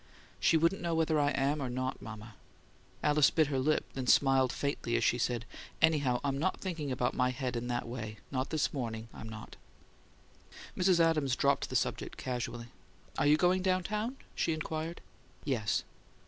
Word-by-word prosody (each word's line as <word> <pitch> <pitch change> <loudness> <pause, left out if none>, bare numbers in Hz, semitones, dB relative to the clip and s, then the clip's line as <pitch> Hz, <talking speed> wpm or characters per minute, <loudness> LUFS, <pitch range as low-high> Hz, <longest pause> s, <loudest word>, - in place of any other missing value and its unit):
"She 165 - +4
wouldn't 165 +5 +2
know 170 -1 -1
whether 160 -1 +2
I 145 0 +3
am 145 +1 0
or 130 - -2
not, 130 +1 -3
mama." 110 0 -9 0.7
Alice 150 -1 +5
bit 160 - +3
her 135 - +1
lip, 155 +4 +1
then 130 -2 -4
smiled 135 -2 +4
faintly 140 -4 -2
as 115 - +2
she 120 - +2
said: 120 -1 -1 0.3
"Anyhow, 145 -6 +3
I'm 140 -1 -1
not 185 +5 0
thinking 165 -7 -3
about 125 0 0
my 125 -1 +2
head 125 -1 -3
in 120 +1 -3
that 120 -1 -2
way 110 -3 -6
not 130 0 -1
this 155 -3 0
morning, 115 -4 -4
I'm 110 - -8
not." 110 -1 -9 1.2
Mrs. 180 -1 +3
Adams 155 -6 +3
dropped 140 +1 +1
the - - -5
subject - - -1
casually. 120 -2 -4 0.5
"Are 145 - +3
you 150 +1 +6
going 180 +3 +3
down 185 -1 +1
town?" 215 +7 -2 0.2
she 165 - 0
inquired. 155 +1 -4 0.4
"Yes." 120 -7 0
135 Hz, 175 wpm, -32 LUFS, 125-160 Hz, 1.2 s, you